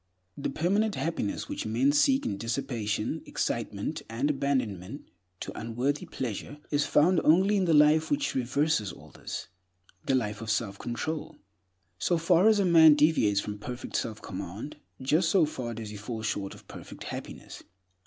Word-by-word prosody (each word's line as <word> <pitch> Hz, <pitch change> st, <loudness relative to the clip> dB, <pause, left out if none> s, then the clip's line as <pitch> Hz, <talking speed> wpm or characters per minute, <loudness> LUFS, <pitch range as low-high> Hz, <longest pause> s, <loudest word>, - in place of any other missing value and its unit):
The 140 Hz, -, -3 dB
permanent 200 Hz, +6 st, +1 dB
happiness 160 Hz, -11 st, -2 dB
which -, -, -4 dB
men 125 Hz, +6 st, +2 dB
seek 270 Hz, -, +3 dB
in 100 Hz, -, -2 dB
dissipation, 115 Hz, -2 st, -2 dB
excitement, -, -, -2 dB
and 125 Hz, +6 st, 0 dB
abandonment 130 Hz, -, -2 dB, 0.3 s
to -, -, -4 dB
unworthy 120 Hz, +6 st, -2 dB
pleasure 130 Hz, +4 st, -5 dB
is 145 Hz, 0 st, +1 dB
found 170 Hz, +4 st, +4 dB
only 190 Hz, +6 st, +4 dB
in 195 Hz, -2 st, +2 dB
the 165 Hz, -, +3 dB
life 150 Hz, +2 st, +5 dB
which 290 Hz, 0 st, 0 dB
reverses 130 Hz, -, 0 dB
all -, -, -14 dB
this— -, -, -7 dB, 0.6 s
the 135 Hz, -, +3 dB
life 105 Hz, -4 st, -1 dB
of 110 Hz, -, -6 dB
self 105 Hz, -2 st, -1 dB
control. 150 Hz, +7 st, -4 dB, 0.6 s
So 175 Hz, -, +2 dB
far 170 Hz, +4 st, +4 dB
as 220 Hz, -, +4 dB
a 200 Hz, -, +2 dB
man 160 Hz, -3 st, +8 dB
deviates 145 Hz, -10 st, +3 dB
from 105 Hz, 0 st, -6 dB
perfect 125 Hz, +3 st, -7 dB
self 110 Hz, -2 st, -3 dB
command, -, -, -6 dB, 0.2 s
just 155 Hz, +6 st, +2 dB
so 180 Hz, -4 st, +4 dB
far 125 Hz, -6 st, -5 dB
does 110 Hz, -2 st, -6 dB
he 105 Hz, -, -7 dB
fall 110 Hz, +2 st, -6 dB
short 100 Hz, -3 st, -3 dB
of -, -, -17 dB
perfect -, -, -10 dB
happiness. -, -, -8 dB
135 Hz, 165 wpm, -28 LUFS, 110-160 Hz, 0.6 s, man